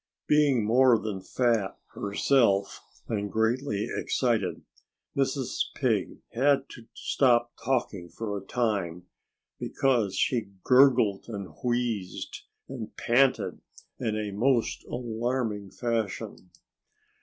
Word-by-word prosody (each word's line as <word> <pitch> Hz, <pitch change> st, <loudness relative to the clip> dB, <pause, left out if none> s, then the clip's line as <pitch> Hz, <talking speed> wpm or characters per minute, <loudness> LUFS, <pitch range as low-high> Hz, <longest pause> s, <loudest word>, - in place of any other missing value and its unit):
Being 145 Hz, -7 st, +3 dB
more 125 Hz, +2 st, +5 dB
than 105 Hz, -3 st, -4 dB
fat, 115 Hz, -1 st, 0 dB, 0.2 s
herself, 100 Hz, -1 st, +2 dB, 0.3 s
and 105 Hz, -2 st, -2 dB
greatly 110 Hz, 0 st, 0 dB
excited, 110 Hz, -9 st, 0 dB, 0.5 s
Mrs. 135 Hz, -1 st, 0 dB
Pig -, -, -1 dB
had 135 Hz, +2 st, +3 dB
to 115 Hz, -1 st, -12 dB
stop 120 Hz, -3 st, +2 dB
talking 115 Hz, -8 st, -1 dB
for 105 Hz, 0 st, -4 dB
a 100 Hz, -, -5 dB
time, 95 Hz, -7 st, -1 dB, 0.5 s
because 120 Hz, -8 st, +1 dB
she 115 Hz, -6 st, 0 dB
gurgled 125 Hz, -6 st, +5 dB
and 100 Hz, -7 st, -6 dB
wheezed 120 Hz, -6 st, -2 dB, 0.3 s
and 125 Hz, -5 st, -7 dB
panted 130 Hz, +2 st, +2 dB, 0.4 s
in 110 Hz, -1 st, -1 dB
a 105 Hz, -1 st, -3 dB
most 120 Hz, +4 st, +1 dB
alarming 115 Hz, -3 st, -2 dB
fashion. 110 Hz, -5 st, -3 dB
115 Hz, 100 wpm, -28 LUFS, 100-125 Hz, 0.5 s, more